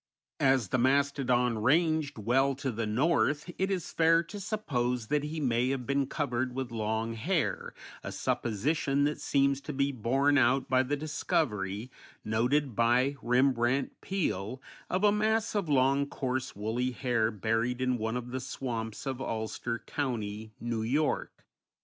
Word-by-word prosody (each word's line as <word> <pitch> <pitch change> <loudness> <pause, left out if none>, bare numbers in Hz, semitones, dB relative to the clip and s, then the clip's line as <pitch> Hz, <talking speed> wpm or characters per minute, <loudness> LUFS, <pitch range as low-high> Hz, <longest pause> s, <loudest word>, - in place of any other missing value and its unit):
As 130 -7 +3
the 130 - +1
mastodon 125 -3 +2
ranged 155 +3 +2
well 130 +6 +2
to 135 -1 -3
the 115 -1 -3
north 145 +6 +1
it 190 +1 +1
is 190 -4 -2
fair 165 +1 +4
to 205 +5 -8
suppose 125 - -2
that 150 -1 +2
he 155 +2 -4
may 125 -3 +1
have 135 -2 -2
been 140 0 +1
covered 130 -4 -2
with 130 -2 -3
long 110 0 -1
hair, 160 +9 -1 0.3
a - - -5
supposition 135 +5 0
that 150 +1 0
seems 140 0 +2
to 150 - -6
be 140 +1 +1
borne 135 +4 +2
out 130 +2 +3
by 130 0 +4
the 130 +3 -1
discovery, 125 - -1 0.3
noted 120 +4 +1
by 125 +5 +3
Rembrandt 125 +1 +2
Peale, 125 - -2 0.3
of 185 +2 0
a 205 - +6
mass 220 +1 +1
of 200 -6 -1
long, 140 +1 +3
coarse, 130 -1 -3
woolly 115 +5 -1
hair 120 -4 +1
buried 115 +3 -1
in 130 -1 0
one 110 +2 -1
of 125 0 -6
the 130 - -2
swamps 120 -4 -5
of 135 -1 -3
Ulster 115 0 -3
County, 110 -6 -3
New 115 -1 -2
York. 140 +7 -1
130 Hz, 155 wpm, -30 LUFS, 115-145 Hz, 0.3 s, a